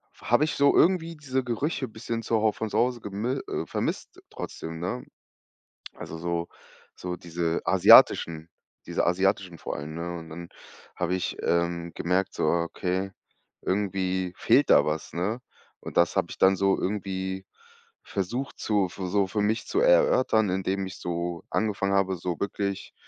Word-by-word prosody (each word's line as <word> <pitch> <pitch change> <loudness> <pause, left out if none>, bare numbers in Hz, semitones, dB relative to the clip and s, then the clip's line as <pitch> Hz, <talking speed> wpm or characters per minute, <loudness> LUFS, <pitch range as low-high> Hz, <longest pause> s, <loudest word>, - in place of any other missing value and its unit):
habe 120 +5 +2
ich 155 - -3
so 140 0 +4
irgendwie 170 -2 +3
diese 130 -3 -2
Gerüche 130 +3 -2
bisschen 115 +1 -5
zu 115 - 0
Hau 110 0 +3
von 110 +1 -4
zu - - -2
Hause 120 -1 +1
gemi 110 +7 -2
äh, - - -3
vermisst - - -3
trotzdem, 80 0 -7
ne, 95 +9 -3 0.9
also 80 - -8
so 85 0 -2 0.5
so 90 0 -5
diese 85 -1 -2
asiatischen 80 0 +6 0.4
diese - - -1
asiatischen 95 0 +1
vor - - -5
allem, 75 +2 -6
ne, 85 +1 -4
und 80 -1 -10
dann 85 +2 -8 0.5
habe 90 0 -1
ich, 90 - -3
ähm, 85 0 0
gemerkt 90 +3 0
so: - - -1
„Okay, 90 +3 -1 0.5
irgendwie 95 -2 -1
fehlt - - +3
da - - +6
was“, 75 +1 -3
ne? 100 +8 -1 0.4
Und - - -7
das - - +3
habe - - +1
ich - - -8
dann 95 0 +5
so 95 0 +2
irgendwie 95 -1 -3 0.6
versucht 120 +8 -3
zu 105 -3 +1
so 95 +2 -1
für 105 +3 -1
mich 110 +2 0
zu 385 - 0
erörtern, - - +4
indem 95 +1 -1
ich 95 - -8
so 85 0 -3
angefangen 100 -2 0
habe, 95 -1 +2
so 85 -1 -4
wirklich, 100 -1 -3
95 Hz, 160 wpm, -27 LUFS, 85-110 Hz, 0.9 s, asiatischen